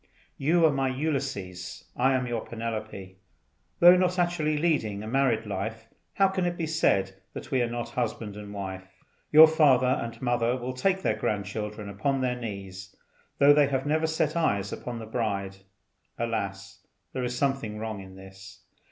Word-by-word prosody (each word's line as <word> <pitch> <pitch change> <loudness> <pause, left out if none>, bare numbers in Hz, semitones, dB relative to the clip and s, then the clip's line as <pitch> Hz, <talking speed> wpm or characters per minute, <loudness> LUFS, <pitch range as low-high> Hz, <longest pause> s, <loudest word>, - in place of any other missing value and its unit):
You 165 +4 +3
are 155 - +5
my 135 -1 0
Ulysses, 130 - -4
I 130 +2 +3
am 125 -1 0
your 120 -2 -3
Penelope; 110 -5 -6 0.6
though 175 +1 +9
not 180 0 +1
actually 170 -4 +1
leading 115 -11 0
a - - -6
married 125 -2 +1
life, 110 +2 -5 0.2
how 195 - +4
can 190 -1 -1
it 175 0 -3
be 165 - -1
said 95 -12 +1
that - - -8
we 130 -2 +2
are 120 - 0
not 120 0 -4
husband 115 -4 -3
and 105 -1 -8
wife. 95 -2 -8 0.3
Your 155 +1 +11
father 145 -5 +4 0.2
and 115 0 -6
mother 120 0 +1
will 125 +1 -4
take 190 +8 0
their - - +1
grandchildren 105 0 -3
upon 110 +8 -1
their 125 -1 0
knees, 100 -5 -7 0.4
though 145 +1 +7
they 145 -1 +4
have 135 0 -1
never 155 +2 +1
set 160 -1 0
eyes 100 - 0
upon 125 -1 -6
the 115 - -7
bride. 100 -4 -2 0.6
Alas! 100 -3 -4 0.3
there 130 - -2
is 125 0 -2
something 135 -6 -1
wrong 110 -2 -5
in 95 0 -12
this. 95 0 -13
120 Hz, 170 wpm, -27 LUFS, 100-140 Hz, 0.6 s, Your